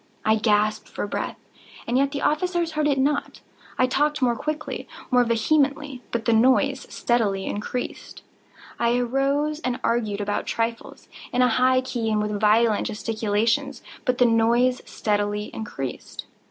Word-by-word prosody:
I 220 +1 +4
gasped 215 0 +1
for - - -4
breath—and 230 +3 -6
yet 275 +1 +3
the 285 - -4
officers 345 +2 0
heard 305 -1 0
it 280 -2 +2
not. 285 +2 0 0.4
I 255 - +4
talked 295 +4 +1
more 245 -3 +2
quickly—more 295 -3 -2
vehemently; 275 +3 +1
but 230 -1 -3
the 230 - +3
noise 260 +4 +3
steadily 205 -5 0
increased. 215 +4 -5 0.6
I 235 +1 +2
arose 275 +5 0
and 255 -5 -2
argued 220 -4 0
about 205 0 -2
trifles, 230 0 -3 0.2
in 250 0 +3
a 250 - +4
high 255 +2 +3
key 240 -3 -3
and 215 -1 +1
with 210 -1 -2
violent 215 +1 +3
gesticulations; 225 +4 -1 0.2
but 250 -1 0
the 250 - +5
noise 235 +2 +3
steadily 205 0 -1
increased. 135 - -6
240 Hz, 140 wpm, -24 LUFS, 220-275 Hz, 0.6 s, the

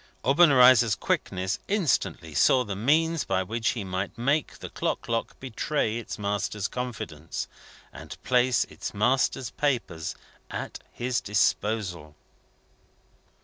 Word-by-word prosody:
Obenreizer's 130 -6 +6
quickness 95 0 -1
instantly 100 - 0
saw 125 - +4
the 100 -4 -5
means 160 +9 +2
by 95 -1 0
which 115 +5 -1
he 105 - -3
might 95 +1 -4
make 140 +6 0
the - - -9
clock - - -2
lock 115 0 -2
betray 130 -2 -1
its 120 - -7
master's 105 0 -2
confidence, 110 -11 -5 0.5
and - - -10
place 125 -1 +3
its - - -7
master's 125 +2 +1
papers 120 - -2 0.3
at - - -5
his 120 0 -2
disposal. 95 -5 0
115 Hz, 115 wpm, -27 LUFS, 95-130 Hz, 0.5 s, Obenreizer's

